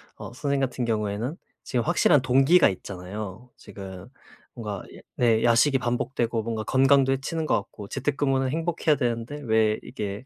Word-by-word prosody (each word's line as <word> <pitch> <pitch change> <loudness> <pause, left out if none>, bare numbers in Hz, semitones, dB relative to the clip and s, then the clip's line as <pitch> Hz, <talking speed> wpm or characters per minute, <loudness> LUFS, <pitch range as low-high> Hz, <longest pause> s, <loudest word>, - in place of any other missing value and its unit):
어 - - -8
선생님 140 +1 -1
같은 130 -1 -1
경우에는 110 - -2 0.3
지금 120 -3 -1
확실한 150 -4 +4
동기가 135 +7 +5
있잖아요. 100 +5 -7
지금 95 -2 -10 0.5
뭔가 105 -5 -5
예 - - -13 0.2
네 115 -2 +3
야식이 120 +4 +4
반복되고 120 -2 -1
뭔가 110 -1 -3
건강도 135 +1 +4
해치는 155 +4 -2
것 - - +2
같고 100 0 -5
재택근무는 135 -1 0
행복해야 160 0 0
되는데 120 +3 -3
왜 110 -2 +2
이게 105 +3 -6
120 Hz, 355 characters per minute, -25 LUFS, 110-135 Hz, 0.5 s, 동기가